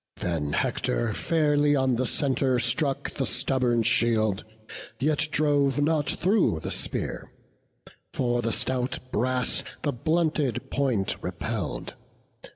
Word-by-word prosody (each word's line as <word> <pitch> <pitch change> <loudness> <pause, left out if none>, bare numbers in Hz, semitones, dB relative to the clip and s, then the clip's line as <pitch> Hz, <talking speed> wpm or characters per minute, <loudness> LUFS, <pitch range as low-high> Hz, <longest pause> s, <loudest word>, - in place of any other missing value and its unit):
Then 80 -4 -2
Hector 115 -2 0
fairly 150 0 +2
on 130 -2 +2
the 125 +1 +1
centre 130 -2 +1
struck 135 +3 0
The 135 - -2
stubborn 125 -3 +1
shield; 110 -3 +2 0.6
yet 150 +2 +1
drove 145 -2 +2
not 150 0 +1
through 185 - +2
the - - -4
spear; - - -3 0.8
For 120 -1 0
the 115 - -1
stout 130 +1 -1
brass 125 +2 0 0.2
the 145 - 0
blunted 155 -2 0
point 125 -9 0
repell'd. - - -4
130 Hz, 115 wpm, -26 LUFS, 120-145 Hz, 0.8 s, fairly